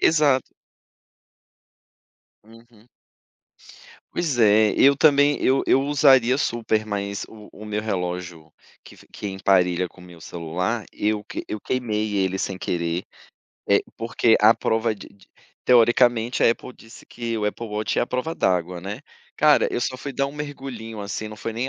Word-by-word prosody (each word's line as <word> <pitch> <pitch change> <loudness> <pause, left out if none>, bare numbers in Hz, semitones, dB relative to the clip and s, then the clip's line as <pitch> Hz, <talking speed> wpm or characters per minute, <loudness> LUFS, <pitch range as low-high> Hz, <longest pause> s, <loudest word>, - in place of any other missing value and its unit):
Exato. 145 -5 +2 1.9
Uhum. 115 +1 -20 1.2
Pois 155 -8 -1
é, 110 -1 +5
eu 140 0 +5
também, 145 0 +4
eu 135 +1 +3
eu 135 - +4
usaria 135 -3 +4
super, 110 -4 -1
mas 100 -1 -3
o 105 -1 -14
o 105 - -11
meu 105 0 -3
relógio 90 -5 -4 0.3
que - - -15
f - - -19
que 105 - -7
emparelha 90 -2 +1
com 90 - -17
meu 90 -1 -14
celular, 90 +7 -4
eu 105 0 -1
que 105 - -7
eu 105 - -5
queimei 110 -4 -2
ele 95 -1 0
sem 95 0 -3
querer. 85 -1 -2 0.6
Eh, - - +4
porque 115 0 +2
à 110 +2 +7
prova 110 0 0
de - - -12
de 100 - -23 0.4
teoricamente, 120 0 +4
a - - +6
Apple 125 +2 -5
disse 115 +1 -15
que 115 -1 -5
o 105 - -2
Apple 110 +3 -3
Watch 105 0 -2
é - - +3
à - - -1
prova 125 +6 -3
d'água, 90 - 0
né. 100 +6 -6 0.4
Cara, 150 -1 +4
eu - - -1
só 130 - -2
fui 140 +2 -6
dar 140 - 0
um 140 - -8
mergulhinho, 135 -7 -7
assim, 100 +2 -5
não 105 - -10
foi 115 +2 -5
nem 120 +4 -3
110 Hz, 165 wpm, -23 LUFS, 100-125 Hz, 1.9 s, à